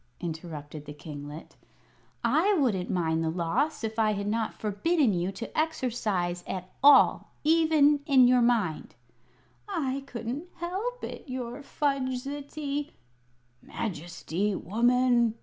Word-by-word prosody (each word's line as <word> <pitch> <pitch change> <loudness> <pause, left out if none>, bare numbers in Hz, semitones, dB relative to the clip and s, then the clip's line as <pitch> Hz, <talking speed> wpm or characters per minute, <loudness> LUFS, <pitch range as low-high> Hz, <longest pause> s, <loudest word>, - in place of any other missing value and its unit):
interrupted 155 -3 -6
the 145 0 -8
kinglet. 150 0 -9 0.7
"I 415 +2 +3
wouldn't 225 - +1
mind 165 -3 0
the 160 - 0
loss 225 - -1
if 220 0 -3
I 215 -1 +3
had 200 0 -3
not 220 +2 -1
forbidden 230 - +1
you 180 +1 -1
to 230 +4 -7
exercise 220 - -1
at 185 -1 -5
all, 285 -1 +6
even 310 -2 +4
in 260 -4 +6
your 250 0 +5
mind." 225 -10 +1 0.7
"I 275 -2 -1
couldn't 245 +6 -5
help 395 +9 -4
it, - - -7
your 255 +1 -5
fudgesty 280 +1 -3 0.4
" 125 0 -39
"Majesty, 185 +1 -3
woman!" 240 +3 +2
235 Hz, 120 wpm, -28 LUFS, 175-280 Hz, 0.7 s, all